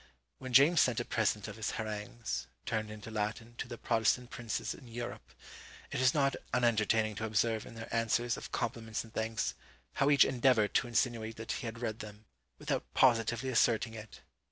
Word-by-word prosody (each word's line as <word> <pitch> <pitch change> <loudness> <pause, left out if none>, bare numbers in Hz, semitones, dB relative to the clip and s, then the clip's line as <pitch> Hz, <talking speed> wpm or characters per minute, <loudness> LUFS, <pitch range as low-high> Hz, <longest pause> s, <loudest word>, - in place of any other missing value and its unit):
When 130 -1 -6
James 145 +7 +7
sent 125 -3 +2
a 120 - -2
present 105 -2 0
of 105 - -8
his 110 - -2
harangues, 110 +1 -4 0.2
turned 110 -1 -1
into 105 +1 -8
Latin, 110 +2 -3
to - - -3
the 120 -1 -7
Protestant 115 +3 +1
princes 115 -3 -3
in 130 - -13
Europe, 120 +1 -6 0.6
it - - -1
is 130 -1 +5
not 140 -2 +3 0.2
unentertaining 110 -2 +2
to 110 - -4
observe 110 +1 0
in - - -11
their 115 0 -7
answers 115 +1 +1
of - - -8
compliments 115 -1 -2
and 115 - -15
thanks, 110 0 -1 0.4
how 140 - +2
each 145 -1 +7
endeavoured 125 -5 +3
to - - +2
insinuate 115 -2 0
that 110 - -5
he 120 - -3
had 115 +1 -6
read 110 -1 -2
them, 105 0 -10 0.3
without - - -3
positively 120 0 +3
asserting 115 -2 +2
it! 110 -1 -10
115 Hz, 180 wpm, -32 LUFS, 110-120 Hz, 0.6 s, James